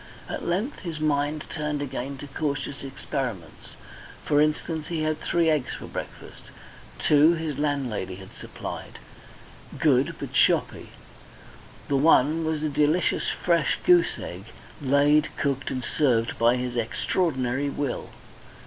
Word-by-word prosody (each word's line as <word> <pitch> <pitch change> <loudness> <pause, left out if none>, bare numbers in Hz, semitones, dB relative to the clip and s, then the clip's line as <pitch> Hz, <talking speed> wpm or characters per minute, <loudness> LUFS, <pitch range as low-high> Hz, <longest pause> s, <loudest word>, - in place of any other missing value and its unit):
At - - -5
length 200 +12 -1
his 165 -5 -5
mind 150 0 0
turned 150 -2 -3
again 135 -1 -4
to 145 - -8
cautious 140 -1 -3
experiments. 130 - -5 0.5
For 145 0 +3
instance, 155 +1 0
he 165 -2 -2
had 155 0 0
three 170 -1 +1
eggs 150 -5 +1
for - - -8
breakfast; - - -8 0.6
two 150 +3 +5
his 160 -3 -4
landlady 130 -11 -1
had 95 0 -12
supplied, - - -8 0.8
good, - - +3
but - - -6
shoppy, - - +2 1.0
and 140 -1 +1
one 160 +1 +4
was 155 -1 -1
a 155 - +1
delicious 150 +4 +2
fresh 170 -4 +1
goose 175 -2 +5
egg, 90 +3 -7 0.4
laid, 145 +2 +4
cooked, 140 -2 -1
and 130 -1 -3
served 120 -6 +1
by 120 +1 +5
his 125 -1 -3
extraordinary 130 +2 0
will. 140 -2 -3
145 Hz, 130 wpm, -26 LUFS, 130-155 Hz, 1.0 s, two